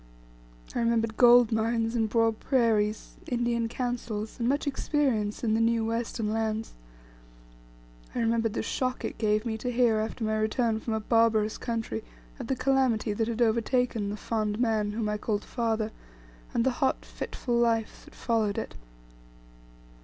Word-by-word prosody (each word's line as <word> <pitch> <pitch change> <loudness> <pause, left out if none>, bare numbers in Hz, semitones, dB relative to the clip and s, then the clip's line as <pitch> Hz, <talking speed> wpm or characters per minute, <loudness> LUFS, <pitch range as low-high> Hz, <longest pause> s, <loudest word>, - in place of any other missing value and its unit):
I - - -1
remembered 230 -1 +1
gold 245 -1 +7
mines, 225 +1 0
and 225 -2 +1
broad 225 -1 +2
prairies, 220 -5 +1
Indian 235 -1 0
councils, 235 -3 -4
and 235 +1 +1
much 285 +3 0
experience 265 -7 0
in 220 -2 +2
the 225 - +2
new 230 0 +2
western 225 -1 -2
lands. 220 0 -2 1.4
I - - -1
remembered 225 -1 +1
the - - -2
shock 255 +2 -2
it - - -5
gave 215 0 +1
me 220 -1 -2
to 245 +3 -2
hear 235 -2 +3
after 220 +2 -3
my 215 0 0
return 220 +1 +1
from 220 0 -3
a - - 0
barbarous 220 -1 +2
country 225 - -3 0.4
of - - -5
the 265 - 0
calamity 255 -5 +1
that 220 +2 -1
had 235 +1 +1
overtaken 230 -1 +1
the 205 - -4
fond 215 -1 -2
man 220 -3 +1
whom 220 0 -2
I 210 0 -2
called 210 -1 -1
father, 225 -2 -1 0.6
and 230 - +1
the 265 - +2
hot 265 - +1
fitful 245 - -5
life 230 -2 0
that - - -16
followed 220 -4 0
it. - - -4
225 Hz, 160 wpm, -28 LUFS, 220-240 Hz, 1.4 s, gold